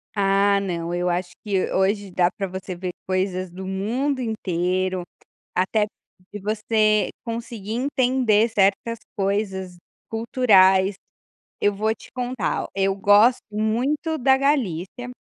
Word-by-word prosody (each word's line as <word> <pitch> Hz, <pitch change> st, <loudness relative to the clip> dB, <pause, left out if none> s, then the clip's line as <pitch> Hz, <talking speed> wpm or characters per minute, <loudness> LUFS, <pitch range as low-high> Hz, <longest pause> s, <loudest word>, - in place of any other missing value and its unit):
Ah 200 Hz, 0 st, +3 dB
não, 175 Hz, -3 st, -3 dB
eu 175 Hz, 0 st, 0 dB
acho 175 Hz, 0 st, -2 dB
que 195 Hz, -3 st, 0 dB
hoje 200 Hz, +1 st, +1 dB
dá 175 Hz, -1 st, +3 dB
pra 195 Hz, -, -3 dB
você 185 Hz, 0 st, -6 dB
ver 180 Hz, +1 st, -4 dB, 0.2 s
coisas 185 Hz, -1 st, -1 dB
do 190 Hz, +2 st, -8 dB
mundo 235 Hz, +9 st, -1 dB
inteiro, 185 Hz, -4 st, -1 dB, 0.5 s
até 200 Hz, +4 st, +2 dB, 0.5 s
de 205 Hz, -, -5 dB
você 215 Hz, 0 st, +1 dB
conseguir 230 Hz, -3 st, -5 dB
entender 245 Hz, -3 st, +2 dB
certas 215 Hz, +2 st, +1 dB, 0.2 s
coisas 195 Hz, -2 st, -2 dB, 0.3 s
culturais. 200 Hz, -5 st, +4 dB, 0.7 s
Eu 205 Hz, -, +3 dB
vou 215 Hz, +2 st, +1 dB
te -, -, -15 dB
contar, 250 Hz, -5 st, -2 dB
ó, -, -, -6 dB
eu 195 Hz, 0 st, +1 dB
gosto 205 Hz, +5 st, +5 dB
muito 250 Hz, +10 st, 0 dB
da 265 Hz, 0 st, +4 dB
Galícia, 245 Hz, -, -1 dB
205 Hz, 125 wpm, -23 LUFS, 190-230 Hz, 0.7 s, gosto